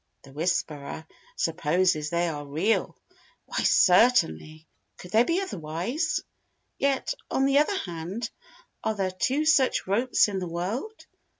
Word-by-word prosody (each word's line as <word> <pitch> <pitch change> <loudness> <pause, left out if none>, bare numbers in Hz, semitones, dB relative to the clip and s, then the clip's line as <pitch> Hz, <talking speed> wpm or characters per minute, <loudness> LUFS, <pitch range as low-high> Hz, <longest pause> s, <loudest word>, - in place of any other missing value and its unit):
The 135 - -15
'Whisperer' 155 -1 -2 0.3
supposes 165 - +1
they 170 +1 0
are 150 -3 -4
real. 160 +10 -1 0.5
Why, - - -3
certainly! 165 - +3 0.3
Could 180 - -12
they 225 +3 +5
be 335 +7 0
otherwise? 215 - -2 0.6
Yet, 275 - 0 0.2
on 270 - +1
the 275 +1 +4
other 380 +7 +1
hand, 180 - -5 0.6
are 220 - 0
there 190 -2 -1
two 265 +11 0
such 295 -5 +3
ropes 230 +7 +2
in 200 -2 -3
the 180 - -4
world? 205 - -4
185 Hz, 130 wpm, -26 LUFS, 160-255 Hz, 0.6 s, they